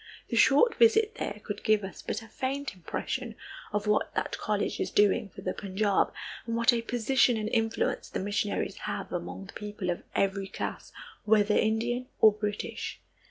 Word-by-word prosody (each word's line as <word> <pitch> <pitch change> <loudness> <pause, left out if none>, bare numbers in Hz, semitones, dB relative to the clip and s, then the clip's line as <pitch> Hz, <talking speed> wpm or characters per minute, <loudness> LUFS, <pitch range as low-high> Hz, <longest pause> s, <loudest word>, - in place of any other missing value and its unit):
The - - -1
short 285 - +6
visit 445 -1 +5
there 205 - -3
could 205 0 -5
give 215 -2 +3
us 190 -2 -7
but - - -4
a - - -12
faint 270 +4 -3
impression 225 +6 -4 0.4
of 210 0 -1
what 210 0 +1
that - - -1
college 210 -1 -1
is - - -1
doing 205 0 +3
for - - -11
the 185 - -2
Punjab 200 0 +1 0.4
and 230 - -1
what 235 +2 +4
a 235 - +1
position 245 +1 +2
and 215 -1 -2
influence 225 -1 0
the - - -3
missionaries 205 +1 -1
have - - -4
among 90 +2 -4
the - - -12
people 205 -3 -3
of 175 - -4
every 195 0 +1
class, 195 - -5 0.3
whether 210 -1 +4
Indian 240 +3 +1
or 215 - +8
British. 210 0 -4
215 Hz, 175 wpm, -29 LUFS, 205-235 Hz, 0.4 s, or